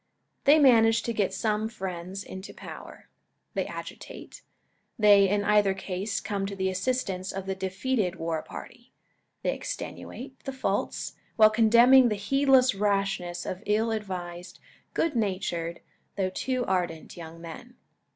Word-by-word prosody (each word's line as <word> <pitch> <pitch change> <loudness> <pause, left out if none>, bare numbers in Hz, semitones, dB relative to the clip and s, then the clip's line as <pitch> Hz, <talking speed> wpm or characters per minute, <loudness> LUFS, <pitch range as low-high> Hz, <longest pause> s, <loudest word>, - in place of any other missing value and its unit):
They 290 +2 +7
manage 230 -6 +5
to 235 - -2
get 205 -3 0
some 215 0 -1
friends 190 -2 -5
into 190 +1 -9
power. - - -10 0.5
They - - -1
agitate. - - -9 0.6
They, 205 -3 +6
in 205 +1 +1
either 205 -2 +3
case, 195 +2 -3
come 200 -2 -3
to 200 - -5
the 190 -1 0
assistance 190 -2 -2
of 195 -1 -5
the 195 - -2
defeated 190 +1 -1
war 165 -2 -2
party. 240 +8 -11 0.5
They - - +1
extenuate 265 - -7
the 270 - -5
faults, 260 - -2 0.2
while 215 -1 +7
condemning 235 +3 +6
the 210 - 0
heedless 265 +4 +4
rashness 195 -3 -1
of 185 - -4
ill 220 +2 +2
advised, 180 -4 -5 0.4
good 325 -4 +1
natured, 185 -6 -2 0.3
though 190 -2 -1
too 255 +5 -1
ardent, 175 -4 -2
young 165 -1 -9
men. 170 +9 -10
200 Hz, 140 wpm, -27 LUFS, 185-230 Hz, 0.6 s, They